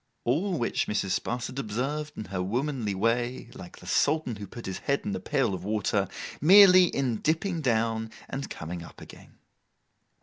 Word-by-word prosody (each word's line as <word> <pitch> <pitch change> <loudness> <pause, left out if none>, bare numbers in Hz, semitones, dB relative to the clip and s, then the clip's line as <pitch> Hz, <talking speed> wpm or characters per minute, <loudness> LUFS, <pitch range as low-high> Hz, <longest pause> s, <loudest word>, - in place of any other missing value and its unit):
All 170 +9 0
which 120 - -1
Mrs. 95 -3 0
Sparsit 125 +2 -4
observed 135 +6 -3
in 110 - -5
her 95 -1 -3
womanly 120 +1 -2
way—like 120 0 -2
the - - -14
Sultan 145 -7 +1
who 100 -1 -7
put 120 +5 -10
his 95 - -4
head 140 0 0
in - - -2
the 95 - -3
pail 135 -1 0
of 90 -1 -5
water—merely 150 - +5
in 130 -8 -1
dipping 165 - -1
down 115 -3 0 0.2
and 135 +1 -5
coming 85 +2 -6
up 80 - -12
again. - - -14
120 Hz, 160 wpm, -27 LUFS, 105-145 Hz, 0.2 s, water—merely